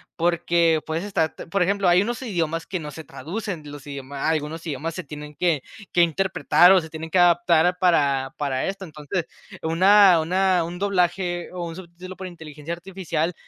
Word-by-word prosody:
porque 170 -1 +2
puedes 160 +2 -3
estar 190 -6 -1 0.2
por 200 +3 0
ejemplo, 195 0 +1
hay 175 +1 +5
unos 240 +4 -3
idiomas 165 -8 -2
que 185 0 -4
no 150 -2 -7
se 160 +2 -9
traducen 170 0 -6
los 145 -1 -10
idiomas 140 0 -7
algunos 160 +1 -2
idiomas 160 +1 -4
se 185 - -5
tienen 150 0 -9
que 165 -6 0 0.3
que 175 - +3
interpretar 175 +1 +4
o 190 - +6
se 160 - -10
tienen 160 +1 -7
que 185 - +2
adaptar 175 0 +4
para 140 -7 +2
para 135 -3 -1
esto. 195 0 -5
Entonces, 155 +2 -4 0.4
una 185 +2 +6
una 185 +1 +2
un 175 +2 -6
doblaje 180 -2 0
o 180 -1 -5
un 165 -1 -7
subtítulo 180 +1 -10
por 190 0 -7
inteligencia 160 -2 -8
artificial 175 -2 -3
170 Hz, 180 wpm, -23 LUFS, 155-185 Hz, 0.4 s, o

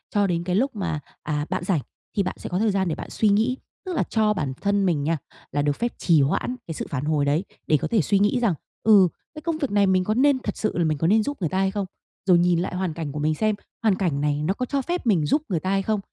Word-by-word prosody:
cho 205 -1 +3
đến 170 -2 -1
cái 180 0 -1
lúc 260 +5 +1
mà, 170 -7 -2 0.2
à, 150 -1 -1
bạn - - -2
rảnh 175 -5 +1 0.4
thì 200 - +3
bạn 185 - -3
sẽ - - -6
có 180 - -1
thời 220 0 +2
gian 190 -1 0
để 160 - -1
bạn - - -8
suy 215 - +2
nghĩ, 225 +6 +2 0.3
tức 370 - -3
là - - +2
cho 215 -1 +2
bản 145 -9 -2
thân 200 -1 +2
mình 160 -6 +1
nha, 165 +2 +1 0.3
là 145 - 0
được 145 0 +1
phép 240 +6 -2
trì 165 -4 +4
hoãn 150 - 0
cái 165 - -4
sự - - -4
phản 140 0 -3
hồi 150 -2 +1
đấy 145 +5 +1 0.2
để 155 - +4
có - - -3
thể 225 -4 +2
suy 200 +4 +2
nghĩ 205 +5 +2
rằng, 230 -6 +2 0.3
ừ, 205 -4 +7 0.3
"Cái 305 - -7
công 330 0 -1
việc 280 -7 -2
này 200 -1 +3
mình 185 -1 +3
có 215 - 0
nên 265 +3 +3
thật - - -4
sự 215 - -1
là 175 - +2
mình 155 -2 +1
có 160 - +1
nên 215 +4 +4
giúp 285 +5 -3
người 170 -5 -1
ta 190 - -2
hay 190 0 +2
không?" 200 0 -2 0.4
Rồi 180 -2 +6
nhìn 175 -1 +3
lại 180 +1 -2
hoàn 180 -3 -1
cảnh 160 -3 -4
của 150 - -5
mình 155 +1 +1
xem, 215 +4 +1 0.3
hoàn 215 -4 +4
cảnh 170 -8 -1
này 150 0 0
nó 175 +5 +1
có 250 - -3
cho 280 +2 -1
phép 345 0 -3
mình 180 -9 +3
giúp 295 - +2
người 175 -5 0
ta 185 - -3
hay 195 0 +2
không? 215 +1 0
190 Hz, 300 wpm, -24 LUFS, 160-215 Hz, 0.4 s, ừ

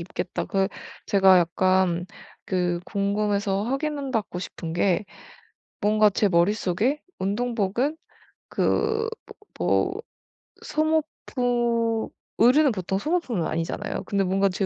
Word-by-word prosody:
입겠다. 170 - -4
그 195 0 +1 0.4
제가 190 -2 +6
약간 180 0 +2 0.4
그 180 -2 0
궁금해서 200 -1 0
확인받고 270 - -2
싶은 165 -2 -6
게 185 +3 +1 0.8
뭔가 215 0 +4
제 205 - +2
머릿속에 205 - +1 0.2
운동복은 235 +7 -1 0.5
그 445 0 +1 0.5
뭐 - - -37
뭐 385 +3 +1 0.6
소모품 245 -7 0 0.3
의류는 265 +5 +5
보통 190 0 -2
소모품은 260 - -1
아니잖아요. 165 +1 -3
근데 200 -1 0
뭔가 195 +2 +2
제 190 +1 -1
205 Hz, 230 characters per minute, -25 LUFS, 185-250 Hz, 0.8 s, 제가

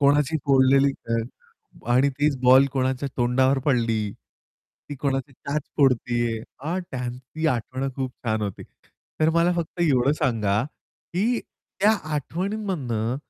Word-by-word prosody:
कोणाची 145 +2 +3
फोडलेली 135 +1 +5 0.2
अ, 115 - +2 0.8
आणि 130 +3 +4
तीच 145 -1 +2
बॉल 130 +2 +7
कोणाच्या 130 +1 -1
तोंडावर 130 +2 +2
पडली. 115 -5 +2 0.9
ती 145 - -5
कोणाची 135 0 -1
दात 140 +4 -3 0.2
फोडतीये 120 -4 +2 0.2
अ, 165 +6 -2
त्यांची 125 +5 -4
आठवण 130 +2 -2
खूप 130 -2 -2
छान 110 -2 0
होती. 100 -2 -4 0.6
तर 155 - +4
मला 170 +1 +3
फक्त 170 +1 -4
एवढं 140 -5 +3
सांगा, 110 -7 +1 0.5
की 220 +7 +1 0.4
त्या 205 +2 +6 0.2
आठवणींमधनं 150 - -2
135 Hz, 120 wpm, -24 LUFS, 125-150 Hz, 0.9 s, बॉल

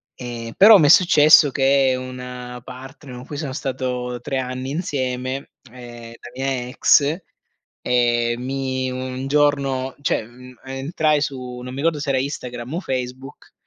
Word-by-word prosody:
Eh, 120 -2 -7
ehm, - - -7
però 210 +1 +9
m'è 145 -2 +4
successo 155 -4 +6
che 135 -1 +3
una 125 -1 -8
partner 130 +1 -11
con 125 +1 -10
cui 145 - -7
sono 140 -4 -4
stato 125 -2 -3
3 135 +2 -3
anni 130 +1 -4
insieme, 130 -4 -3 0.2
uhm, 120 -2 -11
la 120 +1 -13
mia 130 -2 -2
ex, 145 +3 +3 0.7
uhm, 120 -1 +1
mi 130 -1 -2
un 130 +1 -5
giorno 140 -3 +1
cioè - - +1
ehm, 125 +2 -14
entrai 145 +3 0
su, 125 -3 -5
non 125 - -7
mi 130 - -8
ricordo 155 0 0
se 140 - -4
era 130 -1 +2
Instagram 125 -1 -5
o 175 - -1
Facebook, 130 0 -6
130 Hz, 155 wpm, -21 LUFS, 125-140 Hz, 0.7 s, però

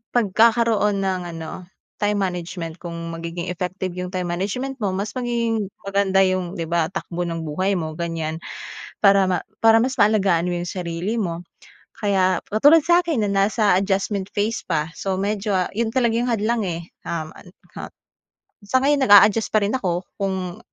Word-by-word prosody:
pagkakaroon 220 -2 +3
ng 190 -1 -1
ano, 165 +2 -8 0.3
time 210 0 +1
management. 180 -3 -3
Kung 170 -2 -7 0.2
magiging 170 +1 -5
effective 180 +1 -4
iyong 180 +1 -5
time 180 -1 -2
management 250 +10 -3
mo 195 -4 -1
mas 200 +2 -3
magiging 230 -3 -1 0.2
maganda 195 -1 +2
iyong 185 -1 -1
'di 170 - -3
ba, 170 -2 +2
takbo 175 -1 -4
ng 165 -1 -4
buhay 185 +6 -1
mo, 160 -2 -4
ganyan. 165 -2 -3 0.6
Para 200 -1 +5
ma 185 -1 0 0.2
para 225 0 +5
mas 260 +2 -1
maalagaan 195 -5 +3
mo 180 - -1
yung 175 - -5
sarili 180 +4 -3
mo. 175 -6 -2 0.5
Kaya 190 -3 +1
katulad 290 +9 +6
sa 345 +2 +5
akin 325 -10 0
na 205 - 0
nasa 200 -1 +3
adjustment 195 0 -1
phase 215 +3 0
pa. 160 -2 -1
So 190 +3 -3
medyo, 200 +1 -1
ah, 185 -1 0
iyon 230 +3 -1
talaga 235 -3 +2
iyong 245 - -1
hadlang, 220 0 0
eh. 170 -1 -4 0.2
Um, 160 -2 -3
ant 180 +2 -16 0.2
hut - - -8 0.6
sa 255 +6 0
ngayon 290 +1 +3
naga-adjust 210 -2 +5
pa 215 - +4
rin 200 - 0
ako 185 -8 -1 0.2
kung 190 -3 -3
195 Hz, 170 wpm, -22 LUFS, 175-215 Hz, 0.6 s, katulad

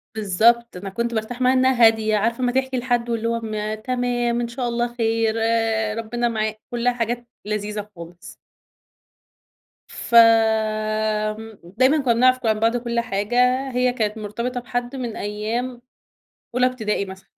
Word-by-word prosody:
بالضبط، 220 +2 +2
أنا 195 +2 -6
كنت 235 +4 -3
بارتاح 230 +3 -4
معاها 255 +1 +4
إنها 260 -2 +4
هادية، 220 -1 +3
عارفة 230 +4 -1
أمّا 245 - +2
تحكي 265 0 -1
لحد 240 -1 -1
واللي 230 -1 -1
هو 230 0 0
م 215 -1 -3
تمام 240 +1 -1
إن 240 - -2
شاء 245 +1 -4
الله 240 0 -2
خير، 225 -1 0
آآ، 225 -1 +1
ربنا 240 +2 -2
معا 215 -1 -1 0.2
كلّها 240 +1 +1
حاجات 240 0 -3 0.2
لذيذة 210 0 -4
خالص. 170 +1 -11 1.5
ف - - -9
آمم، 220 -1 +2
دايمًا 255 - +2
كنّا 250 -3 +2
بنعرف 255 +2 +4
ك - - -9
عن 220 -1 +2
بعض 230 +2 +2
كل 235 -1 -2
حاجة، 205 +1 -2 0.3
هي 250 0 +1
كانت 220 -3 -2
مرتبطة 235 +4 -4
بحد 245 +1 -4
من 245 -4 -4
أيام 230 +4 -4 0.7
أولي 250 0 +3
ابتدائي 220 -5 -1
مثلًا. 190 0 -12
230 Hz, 155 wpm, -22 LUFS, 215-245 Hz, 1.5 s, معاها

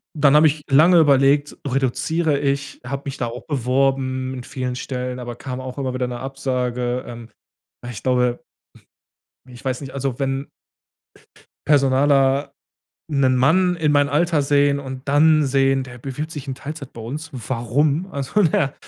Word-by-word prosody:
dann 145 -1 +4
habe 155 +1 +7
ich 150 0 -2
lange 160 +6 +6
überlegt: 145 -1 +3
„Reduziere 140 +4 0
ich?“, 140 0 -2
habe 140 +3 -5
mich 140 -1 -5
da 120 - -2
auch 120 +2 -8
beworben 130 -1 0
in 125 -2 -7
vielen 125 -1 -4
Stellen, 125 0 -4
aber 120 -1 -6
kam 130 +1 -6
auch 130 0 -7
immer 130 -2 -2
wieder 125 -1 -1
'ne 120 -1 -5
Absage. 125 -2 -2
Ähm, 120 -1 -9 0.6
ich 120 -4 -7
glaube 125 -1 +1 1.0
ich 125 -2 -14
weiß 130 0 -2
nicht, 135 -2 -8
also, 135 -2 -3
wenn 135 0 -2 1.2
personaler 140 0 +3 0.6
'nen 135 -3 +2
Mann 180 +8 +3
in 155 -3 +1
meinen 145 -1 +3
Alter 155 +1 +1
sehen 140 0 +2
und 130 0 -8
dann 155 +2 +4
sehen: 135 0 +2
„Der 125 -1 -11
bewirbt 140 +5 -5
sich 145 -4 -7
in 135 - -3
Teilzeit 140 +1 -8
bei 115 - -10
uns, 150 +8 -6
warum?“ 130 - -1
Also, 140 +9 0
der 160 -5 +1
135 Hz, 160 wpm, -21 LUFS, 130-145 Hz, 1.2 s, habe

